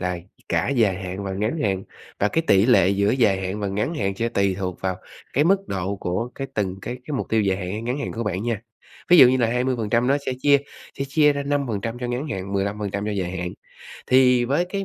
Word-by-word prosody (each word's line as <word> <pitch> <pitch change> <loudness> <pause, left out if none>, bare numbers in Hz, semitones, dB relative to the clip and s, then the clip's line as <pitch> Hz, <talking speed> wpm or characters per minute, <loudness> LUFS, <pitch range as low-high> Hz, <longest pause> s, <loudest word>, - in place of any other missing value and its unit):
là 90 -1 -2 0.3
cả 85 +2 +1
dài 110 -8 +2
hạn 95 +2 -5
và 95 - -3
ngắn 110 +10 -1
hạn, 95 -2 0 0.4
và 105 - +3
cái 165 - 0
tỷ 100 +2 +5
lệ 120 -8 +5
giữa 100 +1 +2
dài 110 -7 +2
hạn 95 +2 -3
và 100 - -1
ngắn 105 - -2
hạn 100 -9 -1
sẽ 115 +3 0
tùy 100 -4 +1
thuộc 90 -2 -4
vào 95 -1 -1 0.4
cái 145 - +3
mức 195 +3 +2
độ 95 +1 -2
của 95 +6 -3
cái 135 - -4
từng 95 -2 -2
cái 125 - -4
cái 150 - -5
mục - - -3
tiêu 110 - +3
dài 95 -2 +1
hạn 90 -2 -4
hay 110 +2 -4
ngắn 125 +4 -2
hạn 140 - -4
của 115 - -3
bạn 95 -2 -2
nha. 115 -3 -2 0.5
Ví 175 - +8
dụ 130 -4 +10
như 130 - +3
là 120 - +3
20% 120 -1 0
nó 140 - +3
sẽ - - 0
chia 145 0 +5 0.4
sẽ 135 - -1
chia 150 +1 +4
ra 140 0 -3
5% 120 -6 -2
cho 125 - -2
ngắn 125 +5 -3
hạn, 95 -6 -4
15% 100 0 -2
cho - - -1
dài 95 -3 -2
hạn. 90 0 -3 0.5
Thì 125 -1 +5
với 140 +8 +1
cái 195 +2 -4
110 Hz, 245 wpm, -23 LUFS, 95-130 Hz, 0.5 s, dụ